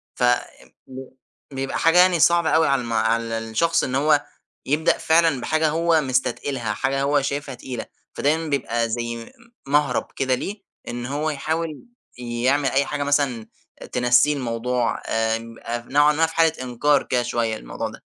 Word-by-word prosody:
ف - - -3 0.6
ب 130 0 -9 0.4
بيبقى 135 0 -3
حاجة 165 +2 +4
يعني 180 -1 +5
صعبة 170 0 +4
أوي 160 -1 +3
على 135 -2 +2
الم 115 -1 -5
على 115 +1 +1
الشخص 160 +10 0
إن 130 - -2
هو 145 +1 +3 0.4
يبدأ 150 +4 +2
فعلًا 160 -4 +2
بحاجة 155 +2 +1
هو 165 +1 +2
مستتقِلها، 130 -3 -1
حاجة 135 +5 -1
هو 140 +1 +2
شايفها 140 -1 -3
تقيلة، 125 -1 -6 0.3
فدايمًا 160 +3 0
بيبقى 120 -5 -1
زي 120 +1 -3
م 115 - -9 0.4
مهْرَب 145 -1 +2
كده 130 -1 +1
ليه 200 - -6 0.3
إن 120 0 -5
هو 145 +4 -2
يحاول 155 +1 -3 0.3
يعمل 125 +3 0
أي 140 +1 +1
حاجة 145 +1 -3
مثلًا 140 -6 0 0.4
تنسّيه 125 +4 +4
الموضوع. 125 -2 -2
آمم، 115 +1 -2
آآ 120 0 -5
نوعًا 145 +2 +4
ما 160 +2 +3
في 160 - -7
حالة 165 -1 +4
إنكار 135 +3 +1
كده 125 -1 0
شوية 120 -2 -1
الموضوع - - -5
ده. - - -13
135 Hz, 160 wpm, -22 LUFS, 120-150 Hz, 0.6 s, يعني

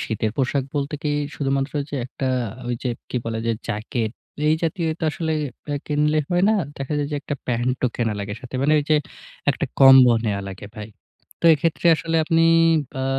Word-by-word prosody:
শীতের 110 -1 -2
পোশাক 135 0 0
বলতে 145 +2 -2
কি? 150 -1 0 0.2
শুধুমাত্র 135 0 -1 0.3
একটা 130 +1 -4 0.4
ঐযে 120 +1 -2 0.2
কি - - -2
বলে? 115 -1 -3
যে - - +3 0.2
jacket 110 +1 -2 0.4
এই 155 - +5
জাতীয় 165 +1 -1
একটা 160 - -5
আসলে 160 0 -2 0.5
কিনলে 150 +1 +1
হয় 175 +1 +3
না। 220 - +3 0.2
দেখা 135 +2 -3
যায় 145 - -1
যে - - 0
একটা 145 - -3
প্যান্টও 125 +1 0
কেনা 115 -3 0
লাগে 100 0 -4
সাথে 125 0 -11
মানে 150 +2 +3
ওই 145 - -1
যে 155 - +6 0.5
একটা 145 +1 -2
combo 130 -2 +9
নেয়া 100 -2 -1
লাগে 95 +1 -8
ভাই। 105 0 -7 0.5
তো - - -11
এক্ষেত্রে 165 +3 -1
আসলে 165 +2 -2
আপনি 165 +1 +3 0.6
আ - - 0
135 Hz, 175 wpm, -22 LUFS, 120-150 Hz, 0.6 s, combo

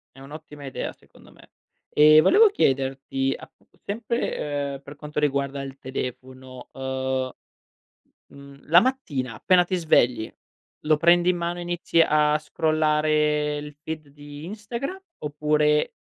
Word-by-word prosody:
È - - -15
un'ottima 150 +1 -11
idea 135 - -4
secondo - - -20
me. - - -20 0.4
E 155 +1 +7
volevo 420 - +6
chiederti 135 - 0
appu - - -16 0.2
sempre, 150 - -3
uhm, 135 - -11
per 145 - -11
quanto 150 0 -5
riguarda 140 -1 -1
il 135 0 -8
telefono, 130 0 -7
uhm, 130 -1 -2 1.0
mhmm, 140 0 -14
la 170 +3 +7
mattina 145 - -2
appena 180 - +3
ti 185 - -3
svegli 125 -9 +2 0.5
lo 155 0 +3
prendi 175 +3 +4
in 180 - 0
mano 175 +1 -3
inizi 175 -1 0
a 150 -1 +4
scrollare 150 -1 +1
il 150 0 -8
feed 155 -2 -6
di 145 +1 -11
Instagram 235 - -6 0.2
oppure 150 0 +1
150 Hz, 130 wpm, -24 LUFS, 135-165 Hz, 1.0 s, E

